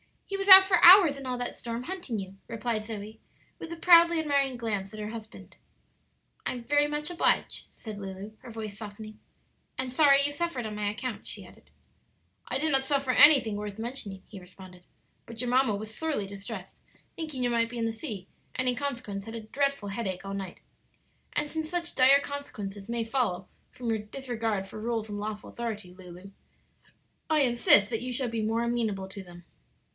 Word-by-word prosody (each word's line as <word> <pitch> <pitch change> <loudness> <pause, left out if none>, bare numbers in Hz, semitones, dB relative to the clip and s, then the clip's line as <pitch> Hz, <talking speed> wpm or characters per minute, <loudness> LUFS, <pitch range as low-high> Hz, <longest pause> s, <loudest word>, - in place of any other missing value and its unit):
"He 395 - -5
was 390 0 -3
out 380 -1 +12
for 380 -2 +2
hours 350 -5 +9
in 275 -1 -8
all 250 -1 -2
that 245 0 -4
storm, 235 +1 -5
hunting 350 -9 -5
you," 195 -1 -7
replied 230 -1 -3
Zoe, 215 0 -7 0.4
with 330 - -8
a - - -4
proudly 340 0 +6
admiring 280 -4 +1
glance 205 -4 -3
at 215 - -8
her 210 0 -4
husband. 220 -1 -10 0.9
"I'm 245 -2 -4
very 290 +3 +2
much 295 +2 -1
obliged," 350 - +1
said 215 -3 -8
Lulu, 195 +1 -7
her 250 - -12
voice 220 -3 -6
softening. 215 0 -9 0.6
"And 260 -1 -3
sorry 280 0 +5
you 290 - 0
suffered 290 -5 -3
on 215 - -5
my 210 -1 -2
account," 215 +3 -5
she - - -6
added. - - -18 0.8
"I 255 - -1
did 310 +3 0
not 270 -1 +3
suffer 275 -1 0
anything 255 -6 +6
worth 205 -1 -6
mentioning," 225 -5 -5
he 200 - -10
responded; 180 0 -14 0.4
"but 230 0 -10
your 250 - -1
mamma 255 -4 +3
was 215 +2 -7
sorely 305 -7 -2
distressed 195 0 -8 0.4
thinking 305 -6 -4
you 245 - +1
might 230 -1 +1
be 240 - -7
in 230 - -1
the 225 - -1
sea 220 - -7 0.3
and, 255 0 -1
in 250 - +2
consequence, 245 -8 -4
had 225 0 -7
a 230 - -5
dreadful 275 -1 -1
headache 195 -3 -4
all 195 - -5
night. 195 -3 -6 0.7
And 295 - 0
since 315 +1 -4
such 345 0 -3
dire 270 +2 +6
consequences 215 -8 -7
may 235 -1 -1
follow 225 -6 -2 0.3
upon 245 -2 -4
your 220 -1 0
disregard 225 -3 -3
for 195 - -9
rules 225 -1 -2
and 205 0 -5
lawful 210 0 -6
authority, 215 -6 -5
Lulu, 180 +1 -12 1.0
I 310 -1 +3
insist 235 -4 +5
that 225 -1 -2
you 250 +1 -4
shall 250 0 -1
be 225 -1 -2
more 225 +2 0
amenable 220 -5 -2
to 195 +1 -8
them. 175 -1 -13
230 Hz, 190 wpm, -28 LUFS, 205-275 Hz, 1.0 s, out